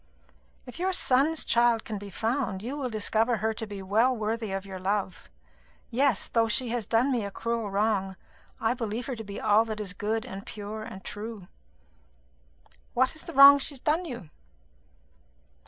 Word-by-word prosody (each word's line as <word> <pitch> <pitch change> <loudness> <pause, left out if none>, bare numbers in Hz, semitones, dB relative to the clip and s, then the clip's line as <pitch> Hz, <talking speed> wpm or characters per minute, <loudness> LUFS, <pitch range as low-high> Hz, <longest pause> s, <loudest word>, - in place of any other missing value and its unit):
"If 250 - -10
your 375 +1 0
son's 300 +1 +2
child 235 -1 +3
can 215 -3 -5
be 200 0 -9
found, 225 -2 -2
you 255 +5 -4
will 275 -4 -3
discover 225 +2 +1
her 220 +2 -1
to 225 0 -6
be 200 -2 -7
well 225 +6 +2
worthy 220 0 -2
of 195 0 -4
your 190 -1 -7
love. 190 -2 -2 0.6
Yes, 260 -2 +2
though 230 -1 +2
she 240 +3 +3
has 230 -3 -2
done 240 +4 +2
me 240 -4 0
a 200 - -4
cruel 230 +1 -3
wrong, 200 -1 0 0.4
I 225 +1 +1
believe 230 -1 -4
her 260 - -4
to 225 - -7
be 200 -1 -7
all 210 +2 +4
that 220 -1 -5
is 200 -3 -4
good 215 +2 -2
and 195 +1 -7
pure 210 +1 -7
and 215 -4 -9
true." 210 -3 -7 1.5
"What 260 +1 +2
is 315 - -6
the - - -9
wrong 280 +1 +10
that - - -6
she 290 - +2
has - - -6
done 315 +7 0
you?" 235 - -8
225 Hz, 190 wpm, -27 LUFS, 205-250 Hz, 1.5 s, wrong